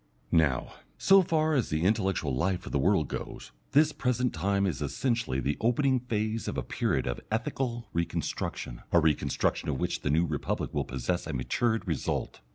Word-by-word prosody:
Now, 75 -7 +2 0.2
so 195 - +6
far 160 -3 +1
as 130 -6 +1
the 80 +1 0
intellectual 95 -7 +1
life 90 +6 0
of - - -7
the 70 - +1
world 80 0 +3
goes, - - -6 0.2
this 150 +2 +5
present 125 -3 0
time 100 +4 +1
is 90 -6 -2
essentially 115 - -1
the 70 +3 -1
opening 130 +3 +3
phase 110 -2 -2
of - - -3
a 65 - -1
period - - 0
of - - -3
ethical 115 +2 -2
reconstruction, 85 -6 -3
a 85 - +6
reconstruction 75 -2 +1
of 65 - -1
which - - -1
the - - -1
New 80 +4 +3
Republic 75 -3 -2
will - - 0
possess 65 +7 -2
the 80 - -4
matured 110 - 0
result. 80 -5 -2
95 Hz, 175 wpm, -29 LUFS, 75-120 Hz, 0.2 s, so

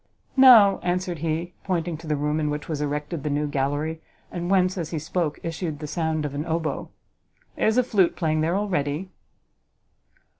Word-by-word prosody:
"No," 235 -7 +8
answered 180 -1 -2
he, 165 +2 -2
pointing 175 -3 -1
to 160 +1 -11
the 150 - +1
room 150 +2 -1
in 150 -1 0
which 150 0 -4
was 155 -3 -3
erected 150 +2 -3
the 150 - -2
new 145 +1 0
gallery, 145 +3 -2 0.3
and 175 0 -4
whence, 185 -1 +3
as 170 -5 -4
he 165 - -3
spoke, 160 0 -2
issued 165 -2 -3
the 150 - -7
sound 160 0 -1
of 145 - -4
a 140 - -4
hautboy, 160 -2 -2 0.7
"there - - +1
is 220 +2 +2
a 250 - +5
flute 200 -7 +2
playing 155 -2 0
there 165 +3 +1
already." 180 -3 -2
160 Hz, 185 wpm, -24 LUFS, 150-180 Hz, 0.7 s, No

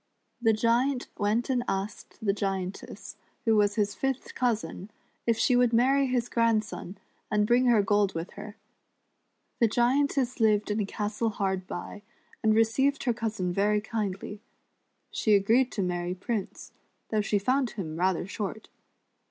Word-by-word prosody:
The 225 -2 +4
Giant 240 +4 +1
went 215 +3 +1
and 250 -2 0
asked 200 +3 -4
the 200 - +3
Giantess, 195 -2 -4 0.3
who 225 -1 +4
was 205 -1 +3
his 205 -2 +1
fifth 270 -1 -3
cousin, 225 -5 -2 0.4
if 230 -1 +3
she 250 +2 +3
would 245 -1 +3
marry 270 +4 +4
his 245 -2 0
grandson, 220 -5 0 0.3
and 210 -1 +2
bring 245 +3 +3
her 225 -4 +5
gold 205 -2 +2
with 165 +3 -4
her. 210 0 -10 1.0
The 230 - +5
Giantess 255 +2 +1
lived 215 -2 +3
in 210 - 0
a 205 - -1
castle 210 +2 -2
hard 190 -3 -2
by, 205 +3 -6 0.4
and 220 -1 +3
received 265 +6 +2
her 245 - +1
cousin 220 -6 -2
very 210 +2 +2
kindly. 210 -2 -4 0.7
She 215 -2 +3
agreed 230 +6 +3
to 200 - -1
marry 180 0 -2
Prince, 205 +2 -4 0.4
though 215 -1 +1
she 205 0 +1
found 255 +5 +1
him 165 -8 -6
rather 180 0 +1
short. 205 +2 -5
215 Hz, 150 wpm, -28 LUFS, 200-240 Hz, 1.0 s, her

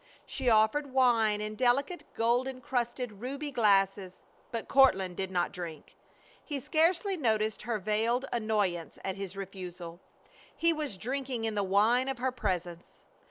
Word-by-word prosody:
She 260 -2 -1
offered 230 +6 +3
wine 230 -5 +3
in 215 0 -4
delicate 275 +8 +1
gold 240 +3 +2
incrusted 245 -4 -3
ruby 280 +4 -4
glasses, 195 -5 +2 0.3
but 230 -2 -5
Courtland 190 -10 +4
did 190 +1 -3
not 180 -2 0
drink. 170 -4 -8 0.5
He 290 -3 -4
scarcely 335 - +1
noticed 220 - 0
her 230 0 -2
veiled 220 +5 0
annoyance 210 -7 -1
at 190 - -2
his 195 -1 -6
refusal. 180 -3 -7 0.6
He 335 0 +3
was 300 -10 -4
drinking 255 +1 -3
in 220 - -1
the 205 - 0
wine 215 +7 +3
of 270 -1 -2
her 255 +1 0
presence. 180 -7 -4
225 Hz, 145 wpm, -30 LUFS, 195-260 Hz, 0.6 s, Courtland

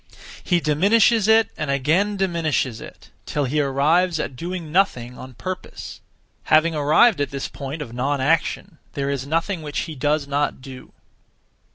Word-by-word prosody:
He 175 -2 +2
diminishes 200 +8 +3
it 220 0 +4
and 155 - -4
again 160 +10 +1
diminishes 160 - -1
it, - - -13 0.2
till 145 - -1
he 150 +4 0
arrives 155 +5 +2
at 135 - -4
doing 170 +1 -5
nothing 125 -10 +1
(on 130 0 -11
purpose). 185 +7 -7 0.4
Having 160 +2 +4
arrived 155 +6 +4
at 145 - -1
this 140 0 -4
point 140 +3 -6
of 115 - -11
non 135 +3 -1
action, 160 +2 0
there 140 0 -2
is 140 -1 -3
nothing 165 +3 -1
which 150 -2 -3
he 160 - -6
does 145 +1 0
not 145 +1 -1
do. 130 0 -10
3. - - -25
150 Hz, 165 wpm, -22 LUFS, 140-175 Hz, 0.4 s, it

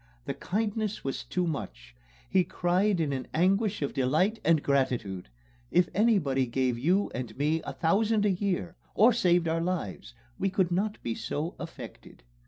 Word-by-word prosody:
The - - -2
kindness 215 +1 -2
was 135 - -3
too 180 -1 -1
much... 140 - -5 0.3
He 185 - +3
cried 180 +3 +1
in 150 -4 0
an 130 -1 -4
anguish 195 +2 +2
of 140 - -2
delight 155 - +1
and 165 -3 +3
gratitude; 120 - 0 0.4
if 175 -1 +3
anybody 175 - +2
gave 125 0 0
you 175 +12 +1
and 120 -3 -5
me 155 +3 +1
a - - -4
thousand 210 +5 +2
a 205 - +3
year, 180 -2 -2 0.2
or 230 +4 +6
saved 175 -6 +3
our 165 +1 0
lives, 165 - -4 0.2
we 195 - +1
could 185 -2 +1
not 205 +4 0
be 115 - -1
so 155 +8 -3
affected." - - -10
175 Hz, 165 wpm, -28 LUFS, 135-195 Hz, 0.4 s, or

